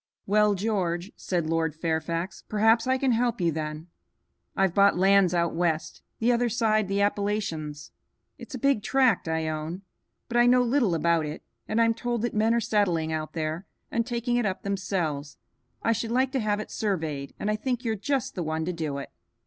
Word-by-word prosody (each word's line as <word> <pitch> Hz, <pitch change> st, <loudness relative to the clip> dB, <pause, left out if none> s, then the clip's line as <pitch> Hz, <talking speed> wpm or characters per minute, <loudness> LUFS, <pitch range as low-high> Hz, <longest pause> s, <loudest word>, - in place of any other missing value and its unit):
"Well, 210 Hz, 0 st, +3 dB
George," 190 Hz, -2 st, -1 dB
said 175 Hz, -4 st, -2 dB
Lord 160 Hz, -1 st, 0 dB
Fairfax, 165 Hz, +2 st, -2 dB
"perhaps 225 Hz, +3 st, +3 dB
I 260 Hz, 0 st, +3 dB
can 265 Hz, -1 st, +1 dB
help 240 Hz, 0 st, +1 dB
you 170 Hz, -2 st, +2 dB
then. 155 Hz, 0 st, -4 dB, 0.7 s
I've 195 Hz, -3 st, +2 dB
bought 200 Hz, -1 st, +4 dB
lands 195 Hz, -1 st, +5 dB
out 170 Hz, -1 st, +1 dB
west, 165 Hz, -2 st, -1 dB, 0.2 s
the 235 Hz, +2 st, +2 dB
other 240 Hz, 0 st, +2 dB
side 215 Hz, -3 st, +1 dB
the 200 Hz, +1 st, +1 dB
Appalachians. 200 Hz, -8 st, -2 dB, 0.5 s
It's 290 Hz, -, -8 dB
a -, -, -3 dB
big 275 Hz, -3 st, +2 dB
tract 250 Hz, -5 st, +2 dB
I 160 Hz, 0 st, -1 dB
own, 155 Hz, +4 st, -4 dB, 0.4 s
but 240 Hz, -, -1 dB
I 240 Hz, 0 st, +6 dB
know 250 Hz, 0 st, +5 dB
little 240 Hz, -7 st, +2 dB
about 165 Hz, -1 st, +2 dB
it, 150 Hz, -, -7 dB, 0.2 s
and 220 Hz, -, 0 dB
I'm 230 Hz, 0 st, +4 dB
told 235 Hz, 0 st, -2 dB
that 240 Hz, -, -1 dB
men 220 Hz, +2 st, +2 dB
are -, -, +3 dB
settling 195 Hz, -8 st, +1 dB
out 155 Hz, 0 st, -4 dB
there 160 Hz, +2 st, -3 dB, 0.2 s
and 230 Hz, -, +1 dB
taking 240 Hz, +1 st, -1 dB
it 240 Hz, -, +1 dB
up 190 Hz, -, -4 dB
themselves. 175 Hz, -7 st, -2 dB, 0.5 s
I 230 Hz, -, +3 dB
should 230 Hz, 0 st, -1 dB
like 260 Hz, +2 st, +2 dB
to 265 Hz, -, 0 dB
have 210 Hz, -2 st, 0 dB
it 215 Hz, -, -6 dB
surveyed, 160 Hz, -9 st, -3 dB
and 210 Hz, -, 0 dB
I -, -, +1 dB
think 250 Hz, +2 st, -3 dB
you're 225 Hz, -, +1 dB
just 265 Hz, +5 st, -1 dB
the 180 Hz, -, -4 dB
one 160 Hz, 0 st, -2 dB
to 180 Hz, -, -2 dB
do 155 Hz, -4 st, -3 dB
it." 140 Hz, -, -7 dB
200 Hz, 195 wpm, -27 LUFS, 165-230 Hz, 0.7 s, I